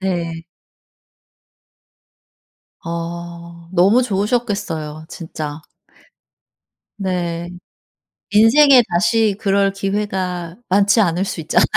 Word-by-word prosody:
네. 170 -3 -3 2.4
어. 170 0 -7
너무 195 +8 +4
좋으셨겠어요, 200 -8 -2
진짜. 155 -2 -7 1.4
네. 175 -3 -2 0.8
인생에 245 +5 +6
다시 195 +4 +2
그럴 195 -1 +2
기회가 190 -4 -3
많지 200 +3 +4
않을 180 0 +1
수 170 - -4
있잖아요. 170 +4 +2
185 Hz, 165 characters per minute, -19 LUFS, 170-205 Hz, 2.4 s, 인생에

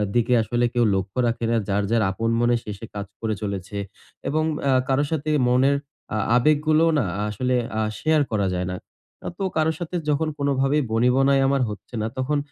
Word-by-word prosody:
দিকে 120 +1 +2
আসলে 120 +2 0
কেউ 120 -1 +2
লক্ষ্য 95 +3 -3
রাখে 115 0 -1
না। - - +2
যার, 100 0 +1
যার 115 -2 +3
আপন 115 +4 -2
মনে 120 0 +3
সে, 105 - -6
সে 115 - -7
কাজ 100 -1 -4 0.2
করে 110 -1 -1
চলেছে। 100 -1 -4 0.5
এবং 155 +2 +1 0.3
আ - - +4 0.2
কারো 135 +2 +3
সাথে 155 -1 -1 0.2
মনের 130 +3 +3 0.4
আ - - 0 0.2
আবেগগুলোও 155 +5 +3
না - - +2 0.3
আসলে 125 +5 -1 0.2
আ - - +1 0.2
শেয়ার 155 -1 +3
করা 100 -3 +1
যায় 90 0 -2
না। - - -3 0.5
আ - - -2
তো 195 - -3
কারো 160 0 +3
সাথে 175 0 -5
যখন 150 +2 +1
কোনভাবেই 140 +1 +1
বনিবনায় 130 +4 +3
আমার 135 0 +2
হচ্ছে 105 +3 -9
না, 110 - -1
তখন 135 +3 0
125 Hz, 190 wpm, -23 LUFS, 110-145 Hz, 0.5 s, আ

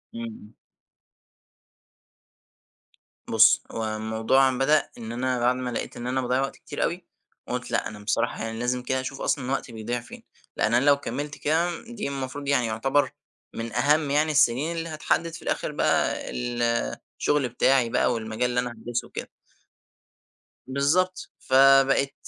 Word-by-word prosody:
إمم، 115 - -5
امم. 110 -1 -10 2.7
بُصّ، - - +6
هو 115 - -3
الموضوع 110 +5 +2
بدأ 135 +4 +2
إن 115 -1 -7
أنا 125 +1 -1
بعد 120 +1 +3
ما 125 -1 -3
لقيت 120 - -4
إن 120 - -5
أنا 130 +1 0
باضيّع 125 +1 +1
وقت 135 - -3
كتير - - -5
أوي، - - -2 0.4
قُلت - - -4
لأ - - 0
أنا 105 -1 -9
بصراحة 105 +1 -1
يعني 115 0 -4
لازم 125 +1 -1
كده 130 +1 0
اشوف 135 +1 -6
أصلًا 135 -3 -1
وقتي 135 -2 -2
بيضِيع 115 +2 -3
فين، 120 - -12 0.3
لأن 110 - +1
أنا 120 +3 +3
لو 145 -1 +6
كمّلت 145 +2 -5
كده، 165 +3 0
دي 235 -6 -5
المفروض 140 +1 -5
يعني 130 -4 +2
يُعتبر 135 +6 +1 0.4
من 115 0 -5
أهم 145 +4 +2
يعني 150 +2 +2
السنين 150 +3 +2
اللي 165 0 -3
هتحدد 160 +1 -1
في 165 - -8
الآخر - - -2
بقى - - +1 1.0
الشُغل 145 -4 +1
بتاعي 125 0 +3
بقى 120 - +2
والمجال 115 +2 -2
اللي 125 0 0
أنا 125 -1 -2
هادْرِسه 120 +1 -4
وكده. - - -7 1.4
بالضبط، 160 +8 0
فبقيت 135 +1 +5
130 Hz, 155 wpm, -25 LUFS, 120-145 Hz, 2.7 s, بُصّ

